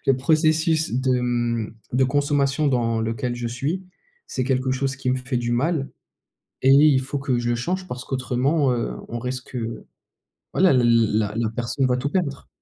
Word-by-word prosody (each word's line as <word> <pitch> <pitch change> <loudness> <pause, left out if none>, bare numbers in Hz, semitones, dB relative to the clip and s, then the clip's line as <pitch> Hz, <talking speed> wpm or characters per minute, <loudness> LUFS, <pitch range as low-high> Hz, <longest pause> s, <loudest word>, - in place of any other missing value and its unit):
le 135 - +5
processus 155 +2 +2
de, 130 0 +1
mmh, 120 -3 -1 0.2
de 130 +1 +4
consommation 140 +1 +1
dans 115 -3 +1
lequel 115 +2 -2
je 120 0 -4
suis, 140 +10 -2 0.4
c'est 130 - -2
quelque 130 0 0
chose 130 0 -1
qui 130 -1 -1
me 130 - +1
fait 125 0 -3
du 120 0 -2
mal 135 +3 0 0.7
et 135 - +3
il 140 -1 +6
faut 135 +2 -4
que 135 -2 0
je 120 0 -2
le 120 - +2
change 180 +10 -3
parce 125 -5 -6
qu'autrement, 130 +2 +1
heu, 120 -1 -2
on 120 - -5
risque, 125 +1 -5
heu, 115 -1 -5 0.7
voilà, 185 -1 +4
la 125 -2 +3
l 115 -2 +3
la 105 -1 0
la 115 -1 0
personne 120 +3 -1
va 125 -1 +1
tout 135 +3 -2
perdre. 150 -5 -2
130 Hz, 190 wpm, -23 LUFS, 120-140 Hz, 0.7 s, il